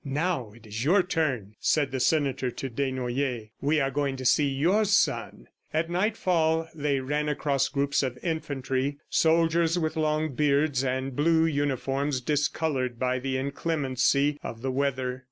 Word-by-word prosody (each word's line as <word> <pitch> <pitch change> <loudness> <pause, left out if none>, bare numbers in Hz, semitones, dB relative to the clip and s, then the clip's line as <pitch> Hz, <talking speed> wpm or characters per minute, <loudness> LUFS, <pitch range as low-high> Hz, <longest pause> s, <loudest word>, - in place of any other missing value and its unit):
"Now 145 - -1
it 115 -1 -17
is 110 +2 -4
your 180 +7 +4
turn," 135 - -1
said 150 -3 +1
the 130 - -2
senator 135 -2 +1
to 130 +2 -5
Desnoyers. 130 -2 -2
"We 150 +3 +2
are 135 -1 0
going 140 -1 -1
to 130 - -6
see 145 +3 +4
your 165 +11 +2
son." 200 -2 +1 0.3
At 165 +2 -1
nightfall, 175 -5 +1
they 145 -3 0
ran 150 +3 -1
across 140 -2 0
groups 140 0 +1
of 130 -2 -3
infantry, 140 -4 -2
soldiers 165 +1 +3
with 160 -2 -1
long 155 -1 0
beards 145 -1 +2
and 130 0 -2
blue 160 +3 +3
uniforms 140 -2 -1
discolored 140 -2 -1
by 130 +1 0
the 130 0 -2
inclemency 140 0 0
of 115 +1 -7
the 135 - -1
weather. 130 -2 -1
140 Hz, 155 wpm, -27 LUFS, 130-155 Hz, 0.3 s, your